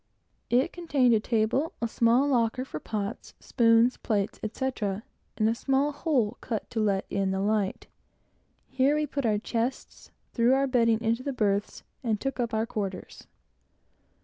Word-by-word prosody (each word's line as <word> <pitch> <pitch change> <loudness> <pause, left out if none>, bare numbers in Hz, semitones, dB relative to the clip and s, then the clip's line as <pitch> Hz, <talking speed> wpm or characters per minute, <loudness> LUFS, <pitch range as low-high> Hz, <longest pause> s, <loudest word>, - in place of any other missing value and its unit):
It 255 +7 +2
contained 290 -8 +2
a 220 - +4
table, 235 +9 0
a 235 - -1
small 235 +4 +3
locker 250 -1 +1
for 155 - -6
pots, 210 +4 -5
spoons, 230 0 +3
plates, 205 -3 -1
etc., 215 -3 -3 0.3
and 215 - +2
a 225 - +2
small 270 +4 +1
hole 265 -7 0
cut 225 -4 -4
to 230 - -2
let 200 -3 +1
in 195 -1 0
the 190 0 -1
light. 205 -1 0 0.8
Here 270 +3 +2
we 300 0 +1
put 280 -3 -2
our 210 -1 +2
chests, 235 +4 -4 0.2
threw 240 +2 +4
our 275 +1 +2
bedding 230 -4 +2
into 230 +1 0
the 275 +1 -3
berths, 205 -4 -1 0.2
and 220 -4 0
took 270 +1 -3
up 240 -1 -1
our 220 0 0
quarters. 195 -5 -6
230 Hz, 160 wpm, -27 LUFS, 215-260 Hz, 0.8 s, a